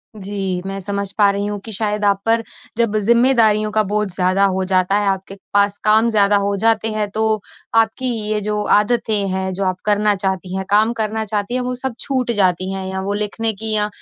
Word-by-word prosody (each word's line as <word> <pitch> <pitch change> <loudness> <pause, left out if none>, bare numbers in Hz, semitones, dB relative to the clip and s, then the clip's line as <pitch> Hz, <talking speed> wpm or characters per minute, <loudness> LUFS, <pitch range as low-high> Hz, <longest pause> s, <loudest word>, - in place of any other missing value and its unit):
जी, 195 -2 -4
मैं 195 0 -4
समझ 200 0 -3
पा 205 -2 +5
रही 200 +1 -3
हूँ 205 -1 -4
कि 220 - -6
शायद 210 0 -1
आप 200 -1 +1
पर, 230 0 +2 0.3
जब 230 -3 +1
ज़िम्मेदारियों 220 -1 +3
का 215 - +2
बोझ 210 +1 -1
ज़्यादा 185 +2 +1
हो 190 -1 0
जाता 185 +1 +2
है, 205 - -1
आपके 195 0 -2 0.2
पास 200 0 +3
काम 220 +2 +4
ज़्यादा 205 -2 +4
हो 200 0 -1
जाते 225 +1 +2
हैं 215 -1 -2
तो, 220 0 -1 0.3
आपकी 225 +3 +2 0.2
ये 215 0 0
जो 210 0 -2
आदतें 210 -1 +1
हैं 190 0 -2
जो 195 - -3
आप 185 -1 -1
करना 210 0 +3
चाहती 190 -1 -3
हैं, 190 0 -3
काम 215 +3 +4
करना 220 -1 -2
चाहती 210 +2 -3
हैं 255 - 0
वो 250 0 -3
सब 255 -1 -3
छूट 255 -3 -1
जाती 185 -1 +1
हैं 190 0 -5
या 190 0 -4
वो 200 +1 -3
लिखने 210 +2 -1
कि 220 +2 -1
या 210 0 +2
210 Hz, 215 wpm, -18 LUFS, 195-220 Hz, 0.3 s, पा